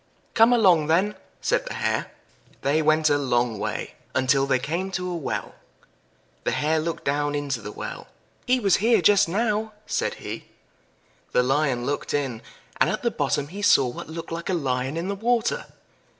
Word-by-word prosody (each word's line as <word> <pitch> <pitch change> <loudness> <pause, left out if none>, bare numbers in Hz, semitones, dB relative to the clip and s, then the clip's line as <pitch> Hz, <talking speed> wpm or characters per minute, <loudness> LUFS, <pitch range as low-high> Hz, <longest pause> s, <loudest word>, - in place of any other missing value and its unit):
"Come 225 +2 +6
along 185 -10 +5
then," 185 +6 +2 0.3
said - - 0
the - - -5
Hare. - - -1 0.5
They 145 +4 +2
went 155 0 +3
a 145 - +3
long 120 -5 0
way, - - -3 0.2
until 135 +1 +3
they 130 - +3
came 165 +8 -2
to 180 -1 -2
a 180 - -3
well. 160 -5 -4 0.9
The - - 0
Hare 155 +2 +1
looked 165 +1 -3
down 145 +1 0
into 140 -4 -2
the 105 - -7
well. - - -7 0.4
"He 255 +1 +3
was 195 -6 +3
here 225 +1 +4
just 200 -4 +5
now," 215 +2 0
said - - -1
he. - - -7 0.9
The 125 - +4
Lion 135 -2 +1
looked 145 +1 -2
in, 130 -6 -2 0.4
and - - +3
at - - -2
the - - +1
bottom 145 0 -1
he 200 +4 -7
saw 135 -9 +5
what 120 - -8
looked 165 +1 -7
like 170 +2 -4
a 185 - +1
Lion 130 -1 -1
in 170 +2 -2
the 200 - -1
water. 230 +3 0
155 Hz, 180 wpm, -24 LUFS, 140-200 Hz, 0.9 s, Come